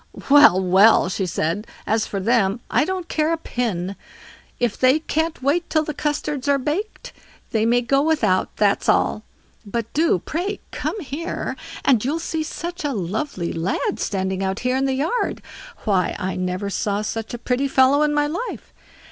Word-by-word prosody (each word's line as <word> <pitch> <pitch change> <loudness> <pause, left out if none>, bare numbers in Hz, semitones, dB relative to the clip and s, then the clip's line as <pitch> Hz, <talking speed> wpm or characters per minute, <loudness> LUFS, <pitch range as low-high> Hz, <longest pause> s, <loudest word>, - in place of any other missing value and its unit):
"Well! 285 -10 +8
well!" 190 +1 +5
she 190 0 -2
said, 170 +6 -2 0.2
"as 220 0 +1
for 200 - -3
them, 215 0 +2
I 300 - +3
don't 370 -1 -3
care 310 +1 0
a 330 - +1
pin. 200 - -3 0.6
If 240 -3 0
they 260 +3 +4
can't 320 -1 -2
wait 320 +6 +1
till 310 -1 +2
the 305 - -4
custards 295 -1 -2
are 280 - +4
baked, 395 - -4 0.4
they 220 0 +1
may 240 +1 +3
go 275 +3 +2
without—that's 210 -8 +1
all. 215 - +2 0.4
But 230 +2 -4
do, 320 - +3
pray, 360 - -3
come 435 - -3
here, 315 +3 -4 0.3
and 245 -6 +4
you'll 285 +6 0
see 325 -1 -3
such 345 +3 -5
a 290 -2 -1
lovely 195 - -3
lad 165 +3 -1
standing 190 -1 -1
out 190 +1 -2
here 250 +1 0
in 265 +1 +1
the 265 -1 0
yard. 320 - -1 0.4
Why 195 -4 +1
I 190 -1 -3
never 185 +2 -2
saw 205 +1 -1
such 225 +2 -4
a - - -5
pretty 250 +3 0
fellow 265 +2 +4
in 300 0 +3
my 295 0 +2
life. 345 +12 -5
255 Hz, 175 wpm, -22 LUFS, 200-305 Hz, 0.6 s, Well